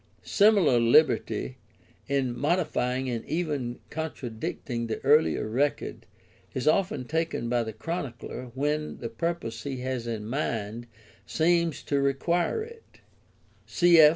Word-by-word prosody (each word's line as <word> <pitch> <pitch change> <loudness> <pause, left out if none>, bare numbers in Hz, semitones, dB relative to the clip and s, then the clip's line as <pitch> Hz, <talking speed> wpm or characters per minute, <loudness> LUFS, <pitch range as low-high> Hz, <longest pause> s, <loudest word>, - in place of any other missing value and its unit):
Similar 200 - +4
liberty 115 - +3 0.5
in 130 -3 0
modifying 130 -5 0
and 120 -3 -2
even 145 -8 -2
contradicting 120 -5 -4
the 110 - -3
earlier 150 -5 +4
record 135 +6 -1 0.5
is 130 - -2
often 165 -5 +2
taken 160 -5 -1
by 120 0 +2
the 110 -1 -3
Chronicler 125 - -5
when 150 +2 -1
the 115 - -5
purpose 115 -2 -3
he 130 0 -4
has 130 -2 -3
in 110 -2 -3
mind 115 -2 -3 0.4
seems 170 0 +2
to 140 - 0
him - - +2
to - - +1
require 170 - 0
it; 460 0 -14 0.7
cf. 170 -3 +7
135 Hz, 125 wpm, -27 LUFS, 120-160 Hz, 0.7 s, cf